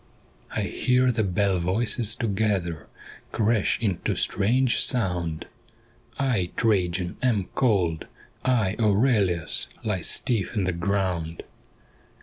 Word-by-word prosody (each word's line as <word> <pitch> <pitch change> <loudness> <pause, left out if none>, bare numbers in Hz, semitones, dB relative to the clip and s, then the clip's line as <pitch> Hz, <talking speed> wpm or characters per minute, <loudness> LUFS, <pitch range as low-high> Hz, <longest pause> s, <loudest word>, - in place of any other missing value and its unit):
1 - - 0
hear 125 0 +1
the 110 -2 0
bell 95 0 0
voices 110 +5 +1
together 95 -7 -1 0.4
Crash 110 -2 +1
into 100 -6 -1
strange 120 +6 +2
sound 90 -9 0 0.2
— - - -34
' - - -29 0.2
I, 90 -6 -1
Trajan, 90 -5 0
am 110 -7 0
cold 95 -11 0 0.2
'; - - -31
I, 115 -6 +1
Aurelius, 105 -6 +2 0.2
Lie 105 -5 -1
stiff 115 +3 +1
in 100 - 0
the 90 - 0
ground.' 85 -2 -2
100 Hz, 120 wpm, -25 LUFS, 90-115 Hz, 0.4 s, strange